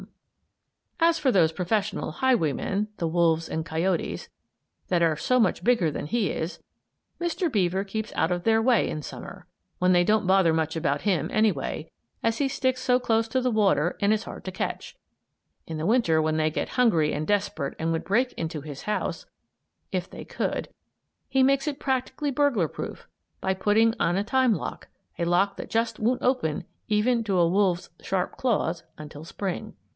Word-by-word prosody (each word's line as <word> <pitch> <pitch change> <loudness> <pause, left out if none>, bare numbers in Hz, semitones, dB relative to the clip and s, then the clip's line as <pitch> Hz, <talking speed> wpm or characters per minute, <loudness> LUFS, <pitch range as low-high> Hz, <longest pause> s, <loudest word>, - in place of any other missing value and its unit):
] - - +4
As 330 - -3
for 270 -3 +2
those 170 -7 +4
professional 200 +2 -1
highwaymen, 205 - +1
the 170 - -1
wolves 165 -1 +2
and 160 0 -3
coyotes, 165 +2 -1 0.6
that 175 -2 +1
are 160 -2 +3
so 255 +9 +2
much 215 -6 +2
bigger 230 -10 +3
than - - -4
he 230 +2 0
is, 160 +3 -4 0.6
Mr. 345 -1 -1
Beaver 190 -3 +1
keeps 220 +2 -5
out 160 - +1
of 175 -1 -1
their 225 0 +3
way 235 -2 +3
in 155 - -4
Summer, - - -9 0.3
when 180 0 +4
they 175 0 +5
don't 210 +1 +2
bother 190 -3 +4
much 160 0 0
about 145 -3 0
him, 190 -6 0
anyway, 195 -7 0 0.3
as 230 0 +1
he 285 - +1
sticks 260 -1 -1
so 250 -1 +3
close 225 -2 +1
to 260 +3 +1
the 250 0 +1
water 195 -6 +2
and 205 +1 +3
is 220 0 -1
hard - - -9
to 185 - -3
catch. 185 - -4 0.7
In 160 - -4
the 155 +2 -2
Winter, 205 -9 +3
when 155 0 0
they 155 0 +2
get - - -2
hungry 170 -12 +2
and 155 - -3
desperate 200 -9 -1
and 165 +1 0
would 165 - -1
break 245 +6 +1
into 160 -2 -4
his 145 -2 -8
house, 210 - -2 0.7
if - - -2
they - - -9
could, - - -3 0.6
he 265 -1 +3
makes 275 +2 +3
it 290 -2 -2
practically 265 +2 -1
burglar 255 - +2
proof, - - -7 0.3
by 190 - 0
putting 210 +4 +3
on 175 +2 +2
a 200 - +1
time 260 +2 +3
lock; - - -6 0.3
a 170 - +1
lock 195 +3 +2
that - - -7
just 230 0 0
won't 245 +4 +1
open, 250 - +1 0.2
even 225 +3 +2
to 200 -4 0
a 170 -1 +4
wolf's 185 -1 +1
sharp 185 -2 -2
claws, 180 -9 0 0.2
until 150 0 -9
Spring. 195 +4 -5
195 Hz, 185 wpm, -26 LUFS, 165-230 Hz, 0.7 s, they